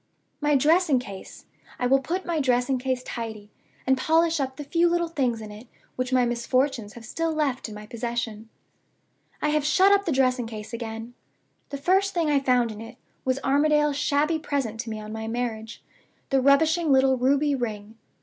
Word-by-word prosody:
My 295 0 +2
dressing 310 +1 +4
case 200 -6 -8 0.3
I 250 - -1
will 270 +2 +4
put 355 +7 -3
my 340 -2 -1
dressing 255 -1 +1
case 255 0 -2
tidy, 220 -4 -6 0.3
and 265 - +4
polish 325 +2 +2
up 265 -1 -2
the 295 - -5
few 335 +4 +2
little 345 0 +1
things 255 -8 -1
in 215 -1 -8
it 215 +4 -12 0.3
which 255 0 -3
my 255 -1 +3
misfortunes 240 -1 -1
have 235 -1 -11
still 330 +7 -2
left 280 -6 -1
in 210 - -9
my 210 0 -9
possession. 230 -1 -4 0.9
"I 300 - +2
have 300 -1 +1
shut 380 +7 +4
up 400 0 +3
the 335 - 0
dressing 255 -3 +1
case 215 0 -8
again. 225 0 -6 0.6
The 280 - -5
first 380 +7 +1
thing 325 -3 +1
I 285 - +4
found 250 -3 +2
in 215 0 -9
it 230 +2 -10 0.3
was 260 0 +1
Armadale's 295 +1 +3
shabby 295 +3 +1
present 270 -8 -3
to 230 0 -4
me 220 -1 -5
on 215 0 -8
my 220 0 -5
marriage 225 -1 -4 0.5
the 270 -1 +3
rubbishing 310 +4 +3
little 265 0 +4
ruby 280 +3 +2
ring. 220 -4 -4
260 Hz, 190 wpm, -25 LUFS, 230-300 Hz, 0.9 s, dressing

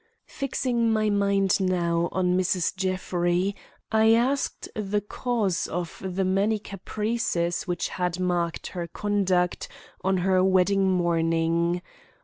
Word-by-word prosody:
Fixing 245 -4 -1
my 215 -1 +2
mind 200 -1 +2
now 175 -2 +1
on 180 -1 +1
Mrs. 185 -1 +1
Jeffrey, 185 0 0 0.4
I 220 0 +5
asked 265 +4 0
the 210 -1 -1
cause 210 -2 -1
of 175 0 -5
the 190 0 -1
many 200 +4 +2
caprices 200 -3 -2
which 175 -1 -1
had 180 -1 -2
marked 175 -2 -1
her 175 -2 -5
conduct 185 -2 0 0.4
on 190 0 +2
her 185 -1 +3
wedding 190 +1 +3
morning. 170 0 +1
185 Hz, 120 wpm, -26 LUFS, 175-205 Hz, 0.4 s, I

